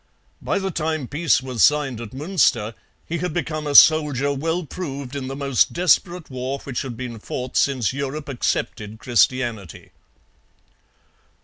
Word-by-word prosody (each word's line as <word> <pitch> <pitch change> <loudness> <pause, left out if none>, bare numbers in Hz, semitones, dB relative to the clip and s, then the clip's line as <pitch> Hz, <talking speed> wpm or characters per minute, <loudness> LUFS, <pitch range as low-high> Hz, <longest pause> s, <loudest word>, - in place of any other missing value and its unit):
By - - -1
the 195 -1 -2
time 155 -4 -2
peace 150 -2 +1
was 125 -4 0
signed 145 -6 +2
at 115 -3 -8
Munster 135 - +1 0.3
he 170 +1 -3
had 180 -1 -3
become 155 -3 -3
a 145 - -2
soldier 145 -3 +6
well 165 +5 -2
proved 140 -5 -6
in 135 -2 -4
the 135 - -5
most 140 -3 +1
desperate 175 -1 +2
war 130 +2 -3
which 130 -3 -4
had 125 -4 -6
been 120 -2 -6
fought 125 +4 -6
since 130 -5 +1
Europe 140 +2 -4
accepted 110 -4 -2
Christianity. 120 -5 0
140 Hz, 145 wpm, -22 LUFS, 125-155 Hz, 0.3 s, soldier